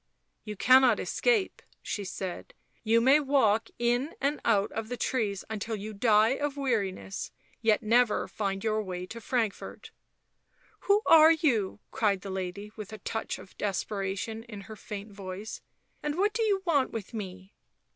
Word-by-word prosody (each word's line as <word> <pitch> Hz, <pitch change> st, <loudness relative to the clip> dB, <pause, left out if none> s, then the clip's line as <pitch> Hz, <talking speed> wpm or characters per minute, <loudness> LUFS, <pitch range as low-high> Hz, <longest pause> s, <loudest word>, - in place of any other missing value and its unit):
" -, -, -49 dB
You 210 Hz, -1 st, -5 dB
cannot 255 Hz, +1 st, +5 dB
escape," 450 Hz, -6 st, 0 dB, 0.2 s
she 205 Hz, -, -3 dB
said. 185 Hz, -1 st, -6 dB
" -, -, -39 dB
You 230 Hz, 0 st, +6 dB
may 270 Hz, +5 st, +6 dB
walk 265 Hz, -7 st, +2 dB
in 245 Hz, +6 st, 0 dB
and 285 Hz, +2 st, 0 dB
out 205 Hz, -3 st, +2 dB
the 225 Hz, +2 st, -4 dB
trees 210 Hz, -8 st, -1 dB
until 220 Hz, +1 st, -3 dB
you 215 Hz, +1 st, -6 dB
die 215 Hz, +1 st, +4 dB
of 285 Hz, +2 st, -2 dB
weariness, 205 Hz, -8 st, -2 dB, 0.3 s
yet 225 Hz, -2 st, +3 dB
never 230 Hz, +1 st, +3 dB
find 195 Hz, -2 st, -3 dB
your 215 Hz, -1 st, +1 dB
way 180 Hz, -3 st, -5 dB
to 230 Hz, +5 st, -9 dB
Frankfort." 225 Hz, -3 st, -3 dB, 1.0 s
"Who 410 Hz, +2 st, +5 dB
are 320 Hz, 0 st, +8 dB
you?" 225 Hz, -, 0 dB
cried 200 Hz, -4 st, +1 dB
the 195 Hz, -, -6 dB
lady, 190 Hz, +2 st, -5 dB
with 215 Hz, -2 st, -8 dB
a 215 Hz, -, -7 dB
touch 220 Hz, +2 st, -4 dB
of 185 Hz, -, -14 dB
desperation 200 Hz, +2 st, -2 dB
in 210 Hz, -4 st, -9 dB
her 220 Hz, +2 st, -10 dB
faint 205 Hz, 0 st, -8 dB
voice. 195 Hz, +1 st, -7 dB, 0.2 s
" -, -, -43 dB
And 295 Hz, +1 st, -2 dB
what 410 Hz, +3 st, +2 dB
do 460 Hz, -, -1 dB
you 405 Hz, -3 st, +1 dB
want 290 Hz, -6 st, +2 dB
with 225 Hz, 0 st, -6 dB
me 190 Hz, -2 st, -7 dB
220 Hz, 165 wpm, -29 LUFS, 200-260 Hz, 1.0 s, are